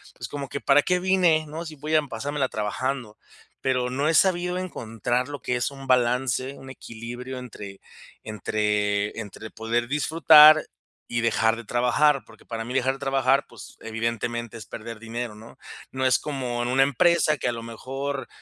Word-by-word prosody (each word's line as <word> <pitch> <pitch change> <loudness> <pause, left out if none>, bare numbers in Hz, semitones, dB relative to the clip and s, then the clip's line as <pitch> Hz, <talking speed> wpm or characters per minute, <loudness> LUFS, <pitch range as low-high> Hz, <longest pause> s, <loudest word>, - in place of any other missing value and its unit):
"Pues - - -7
como 140 -2 -6
que, 140 - -4
¿para 145 +1 +4
qué 180 -1 +1
vine, 180 -4 +3
no? 160 +3 -6
Si 155 -1 -8
voy 155 +2 -2
a 155 - +5
pasármela 140 -1 -3
trabajando". 110 +2 -3 0.4
Pero 125 -1 0
no 140 +4 -1
he - - +2
sabido 180 0 +2
encontrar 125 -6 -2
lo 145 - -7
que 125 - -1
es 120 +3 -1
un 135 -1 -10
balance, 125 +1 +1
un 135 - -11
equilibrio 120 +1 -8
entre 100 -5 -9 0.4
entre 105 -1 -1
entre 110 +1 -8
poder 115 +1 -2
disfrutar 155 +1 +7 0.4
y 120 0 -1
dejar 115 0 +2
de 115 - -9
trabajar, 125 +5 +2
porque 115 -1 -18
para 115 -1 -5
mí 125 - -6
dejar 130 0 +1
de 135 - -10
trabajar, 135 0 +2
pues 115 -5 -13
evidentemente 115 +1 -3
es 110 - -9
perder 115 0 -8
dinero, 115 -1 -5
¿no? 110 +2 -14 0.3
No 130 0 -2
es 130 - +4
como 125 -5 -3
en - - -2
una 135 +1 +4
empresa 155 +3 +3
que - - -1
a - - 0
lo 115 0 -6
mejor, 135 +3 -5
125 Hz, 180 wpm, -25 LUFS, 115-140 Hz, 0.4 s, disfrutar